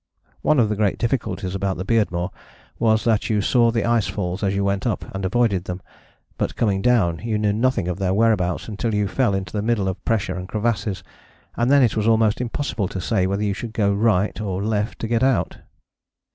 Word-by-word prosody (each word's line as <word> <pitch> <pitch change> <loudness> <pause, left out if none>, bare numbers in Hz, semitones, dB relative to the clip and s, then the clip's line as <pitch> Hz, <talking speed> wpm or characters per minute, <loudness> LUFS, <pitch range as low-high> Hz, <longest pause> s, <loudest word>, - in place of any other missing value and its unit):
One 150 -3 +3
of 115 - +4
the 105 - 0
great 105 -2 +1
difficulties 115 -6 -2
about 95 -1 -1
the 95 - -4
Beardmore 95 -5 0 0.5
was 110 -1 +3
that 110 -3 +1
you 105 -2 +2
saw 115 +3 +3
the 115 -2 0
ice 115 -3 +2
falls 90 -1 -3
as 100 -1 0
you 100 - 0
went 100 +4 0
up, 110 - -2
and 95 0 -4
avoided 100 -2 +1
them, 90 0 -5 0.6
but - - -1
coming 100 -4 +1
down 100 -9 +2
you 110 -2 -2
knew 105 -1 +1
nothing 115 -4 +1
of 90 +1 -3
their 95 -1 0
whereabouts 100 -4 +1
until 110 +1 -2
you 105 -1 +1
fell 100 0 +1
into 95 -2 -4
the 105 - -1
middle 105 -3 0
of 95 0 -4
pressure 105 -5 0
and 90 0 -6
crevasses, 105 -3 -2 0.5
and 120 +2 +1
then 140 -1 +6
it 115 - +2
was 110 0 0
almost 110 0 +3
impossible 120 -4 -2
to 95 - -5
say 95 0 0
whether 100 +2 -1
you 100 -1 0
should 110 +3 -6
go 100 -3 +2
right 105 -1 +1
or 95 -2 -2
left 105 0 -1
to 115 - -4
get 115 0 +1
out. 130 -3 +1
105 Hz, 215 wpm, -22 LUFS, 95-115 Hz, 0.6 s, then